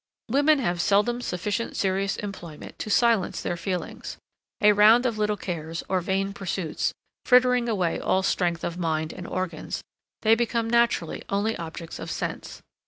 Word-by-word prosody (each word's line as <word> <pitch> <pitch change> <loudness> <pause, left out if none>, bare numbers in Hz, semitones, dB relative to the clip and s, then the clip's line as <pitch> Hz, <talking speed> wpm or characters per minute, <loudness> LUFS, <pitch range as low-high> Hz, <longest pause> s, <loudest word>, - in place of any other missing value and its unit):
Women 290 +5 +4
have 175 -9 0
seldom 210 +8 +2
sufficient 205 +2 -3
serious 195 0 0
employment 175 -7 -8
to - - -4
silence 230 -2 +3
their - - -2
feelings; 180 +1 -4 0.4
a 210 -2 +6
round 220 +4 +6
of 230 -4 0
little 210 0 +1
cares, 165 -3 -4
or 185 -1 +1
vain 195 +2 -1
pursuits, 185 -4 -2 0.3
frittering 250 -1 +4
away 185 -6 0
all 190 - +1
strength 175 -3 0
of 175 +1 -3
mind 160 -2 -1
and 180 -1 -8
organs, 185 -1 -4 0.4
they 220 0 +6
become 230 0 +1
naturally 235 -8 +1
only 205 +3 0
objects 165 0 -7
of - - -6
sense. - - -5
195 Hz, 155 wpm, -26 LUFS, 175-230 Hz, 0.4 s, a